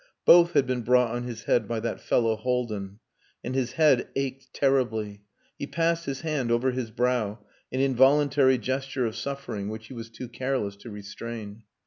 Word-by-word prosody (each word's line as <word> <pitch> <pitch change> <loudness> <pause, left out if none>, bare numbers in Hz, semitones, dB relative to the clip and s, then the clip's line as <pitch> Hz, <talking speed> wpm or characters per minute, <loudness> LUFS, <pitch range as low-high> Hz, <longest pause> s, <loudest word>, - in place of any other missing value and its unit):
Both 175 0 +7
had 140 -2 +4
been 125 -1 -1
brought 125 0 +3
on 120 +1 -3
his 115 -2 -6
head 110 -4 +2
by 115 0 -2
that 115 0 -3
fellow 115 -2 +2
Haldin. 110 -5 -2 0.5
And 125 - -4
his 130 -2 -1
head 150 -6 +4
ached 135 -1 -3
terribly. 110 -7 0 0.4
He 140 - -4
passed 170 +1 0
his 135 -1 -3
hand 150 -7 -1
over 120 +3 +2
his 125 -2 -3
brow 115 -2 0 0.3
an 130 - 0
involuntary 135 0 +4
gesture 130 +1 -2
of 110 -1 -3
suffering, 115 -5 -4
which 110 +1 -7
he - - -8
was 115 -2 -8
too 120 +2 -8
careless 120 -4 -2
to 115 - -11
restrain. 105 +1 -8
125 Hz, 175 wpm, -26 LUFS, 115-135 Hz, 0.5 s, Both